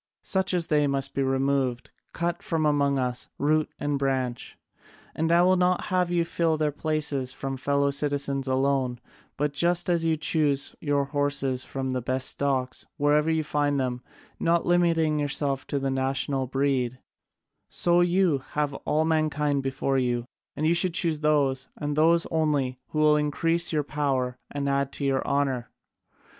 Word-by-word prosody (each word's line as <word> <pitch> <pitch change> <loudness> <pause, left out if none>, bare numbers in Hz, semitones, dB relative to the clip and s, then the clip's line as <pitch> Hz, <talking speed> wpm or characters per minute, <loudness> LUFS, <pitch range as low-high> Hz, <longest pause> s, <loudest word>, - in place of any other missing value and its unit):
Such 190 -1 0
as 170 -2 +1
they 150 -2 +2
must 140 0 0
be 140 - -1
removed, 135 -2 0 0.2
cut 170 0 -2
out - - -27
from 160 -1 -1
among 140 -2 +2
us, 125 -1 -2
root 155 +1 +1
and 145 -1 -1
branch. 130 -3 -2 0.6
And 160 +1 0
I 170 +1 +5
would 185 0 +4
not 180 0 +2
have 180 -1 +2
you 175 -1 +1
fill 165 -1 0
their 155 -1 0
places 150 -3 -2
from 135 0 -4
our - - -5
fellow 140 +1 +1
citizens 140 -1 -2
alone, 130 -2 0 0.4
but, 145 0 -1
just 175 +4 +1
as 170 -1 +1
you 160 -1 +1
choose 150 -2 0
your 145 -2 +1
horses 140 -2 -1
from 130 -1 -4
the 130 -1 -2
best 130 +2 0
stocks, 130 -2 -1
wherever 150 +2 +2
you 160 -1 +1
find 145 -1 0
them, 125 -1 -2 0.4
not 170 0 +2
limiting 165 -3 +2
yourselves 140 -2 -1
to 145 - -2
the 135 -1 -1
national 135 0 -1
breed, 135 -2 0 0.7
so 175 0 +2
you 175 -4 +2
have 150 -1 0
all 155 +3 0
mankind 150 -3 +1
before 135 0 -1
you, 120 -2 -1 0.3
and 155 - -2
you 165 - +4
should 170 0 +2
choose 165 -4 +1
those, 140 -3 +1
and 145 -1 -3
those 165 +2 +4
only, 145 -6 0
who - - -6
will 150 0 +5
increase 165 +3 0
your 150 -2 +1
power 135 -4 -1
and 140 -1 -3
add 140 0 0
to 140 - -4
your 135 -1 +1
honour. 135 -4 0
145 Hz, 170 wpm, -26 LUFS, 135-155 Hz, 0.7 s, I